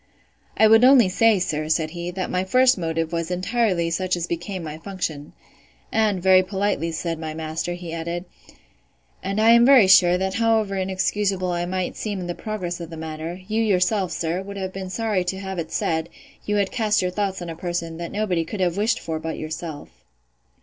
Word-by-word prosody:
I 220 - +6
would 225 +2 +6
only 250 -6 +7
say, 225 +3 +4
sir, 155 -4 -2
said 160 -1 +1
he, 175 +1 -5
that 185 +1 -4
my 180 0 0
first 255 +7 +4
motive 165 -2 -2
was 165 0 -2
entirely 185 -2 0
such 185 +1 0
as 170 -1 -2
became 175 +2 -4
my 155 0 -7
function: 160 -6 -5 0.6
And, 210 -5 +1
very 190 -1 +6
politely, 190 -3 -1
said 165 0 -3
my 155 -1 -5
master, 160 +2 -3
he 175 -2 -7
added, 170 +2 -4 1.0
And 195 +2 -2
I 225 +1 +6
am 235 0 +7
very 255 -4 +7
sure, 180 -1 +6
that 190 +1 -2
however 225 -3 +1
inexcusable 190 0 -1
I 175 0 -2
might 185 0 -2
seem 205 -3 -3
in 180 - -5
the 175 - -3
progress 185 -4 -5
of 165 - -7
the 165 - -8
matter, 160 +3 -6
yourself, 205 -3 +1
sir, 170 +2 -2
would 200 +1 -8
have 190 -1 -4
been 190 -1 -6
sorry 210 -2 -1
to 190 +2 -2
have 190 -2 -5
it 160 -1 -5
said, 160 0 -1 0.4
you 210 - +1
had 200 -2 +1
cast 215 -5 +1
your 180 - -1
thoughts 195 0 -2
on 175 -1 -6
a - - -7
person, 170 -1 -4
that 170 0 -6
nobody 195 -5 0
could 190 +5 -7
have 180 -1 0
wished 220 +3 +1
for 160 -1 -4
but 160 0 -5
yourself. 155 - -7
185 Hz, 200 wpm, -23 LUFS, 165-205 Hz, 1.0 s, only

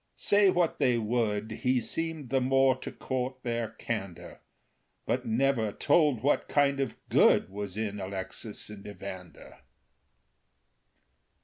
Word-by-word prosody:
Say 205 -1 +4
what 175 -3 +1
they 125 -2 +3
would, 110 -2 -1
He 130 -1 +2
seemed 160 -1 -3
the 135 -1 +2
more 135 0 +4
to - - -7
court 130 0 -3
their 115 -2 -2
candor; 105 -5 -6 0.7
But - - -1
never 115 -2 +1
told 145 -2 +2
what 145 - +2
kind 140 -1 +2
of 135 - -2
good - - +4
Was 100 -1 -5
in 105 -2 -3
Alexis 95 +3 -5
and 105 -1 -10
Evander. 95 -5 -9
120 Hz, 125 wpm, -29 LUFS, 105-135 Hz, 0.7 s, Say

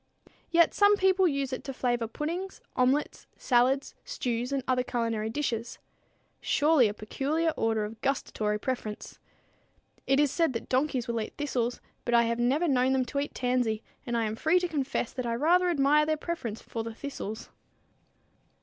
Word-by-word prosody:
Yet 340 -1 +4
some 410 0 +5
people 380 -1 +4
use 275 -3 -1
it 255 - -4
to 270 -2 -5
flavor 240 -3 0
puddings, 335 +10 -4 0.2
omelettes, 260 +4 +1
salads, 260 +2 +2
stews 245 - -3
and 275 -2 -1
other 255 -1 +2
culinary 230 -3 -2
dishes. 235 -3 -3 0.6
Surely 295 -5 +3
a 205 - -3
peculiar 295 +10 -1
order 220 -6 0
of 215 +1 -9
gustatory 215 -6 -1
preference! 215 -2 -5 0.9
It 270 +1 +3
is 295 -2 +3
said 330 -4 +1
that 230 - -5
donkeys 260 -2 0
will 230 -1 -1
eat 215 - -7
thistles, 250 -5 -2 0.2
but 240 - +1
I 235 - +6
have 230 0 -1
never 275 +8 +2
known 260 -2 +3
them 260 -1 +1
to 280 - -3
eat 285 - -4
tansy, 245 -3 0 0.2
and 240 -1 -2
I 230 - +1
am 215 0 -2
free 320 +9 +3
to 355 - 0
confess 275 -6 -2
that 255 -2 -3
I 230 - 0
rather 350 +7 +3
admire 300 -1 +3
their 310 0 +1
preference 270 -10 -5
for 225 - -4
the 225 0 -7
thistles. 225 -5 -6
255 Hz, 175 wpm, -28 LUFS, 230-300 Hz, 0.9 s, I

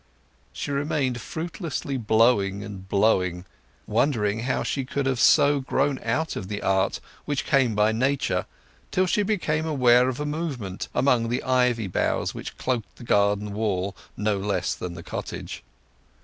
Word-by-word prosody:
She - - -5
remained 140 -3 -1
fruitlessly 160 -4 -4
blowing 110 -4 +2
and 95 -3 -9
blowing, 90 -4 +2 0.4
wondering 110 -3 +1
how 125 +3 -1
she 135 - -1
could 140 +2 -2
have 130 -2 0
so 145 +1 +5
grown 135 +1 0
out 145 +8 -1
of 95 - -5
the 100 0 -4
art 95 0 +1 0.3
which 145 -2 -1
had 135 -1 +3
come 110 - -3
by 105 +1 +3
nature, 130 +5 0 0.4
till 185 - +2
she 195 +3 +1
became 170 -7 0
aware 125 -4 +4
of 130 - -4
a 150 - -2
movement 145 - -4
among 125 -3 +2
the 120 - -1
ivy 125 -3 +2
boughs 95 - -1
which - - -7
cloaked 125 -4 -2
the - - -12
garden 100 -1 +1
wall 100 -2 -1 0.2
no 105 -1 0
less 95 -2 -1
then 90 -1 -6
the 85 - -9
cottage. - - -6
120 Hz, 160 wpm, -25 LUFS, 105-140 Hz, 0.4 s, so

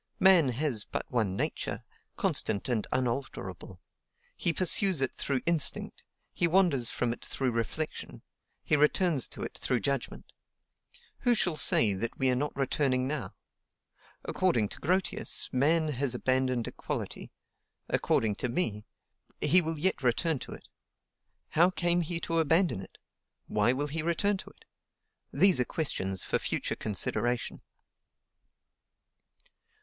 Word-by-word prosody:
Man 185 -7 +6
has 125 -3 +1
but - - -4
one 110 -7 0
nature, - - -3 0.3
constant 100 - 0
and 120 -4 -1
unalterable: 130 +1 -4 0.6
he 170 - +2
pursues 185 0 +3
it 130 -1 0
through 135 -3 -2
instinct, 170 -4 0 0.3
he 170 - +1
wanders 165 -9 +2
from 120 -1 -1
it - - -13
through 130 -2 -1
reflection, 115 +7 -4 0.4
he - - +2
returns 150 -1 +2
to - - -8
it - - -6
through 125 - 0
judgment; 140 -3 -3 0.9
who 245 -2 +2
shall 180 -6 +1
say 115 -8 +5
that 115 +5 -4
we 130 -1 +2
are - - +1
not 145 +4 -2
returning 130 -1 0
now? 135 -9 -4 0.9
According 120 - +1
to - - -8
Grotius, 185 -1 -1
man 155 +5 +2
has 135 -2 -1
abandoned 130 -1 0
equality; - - -6 0.6
according 110 -2 +1
to 125 - -2
me, 110 - -1 0.5
he 185 - +5
will 160 -1 -3
yet 175 +1 0
return 135 +4 0
to - - -8
it. - - -13 0.8
How 175 +3 +4
came 175 -1 +1
he 165 0 -2
to 165 -1 -1
abandon 165 - +2
it? 95 - -13 0.5
Why 105 +2 +2
will 135 +3 -1
he 150 +2 -3
return 170 +5 0
to - - -10
it? - - -23 0.7
These 185 +1 +4
are - - +4
questions 95 - -1
for - - -1
future - - -2
consideration. 110 +3 -2
140 Hz, 135 wpm, -29 LUFS, 120-170 Hz, 0.9 s, Man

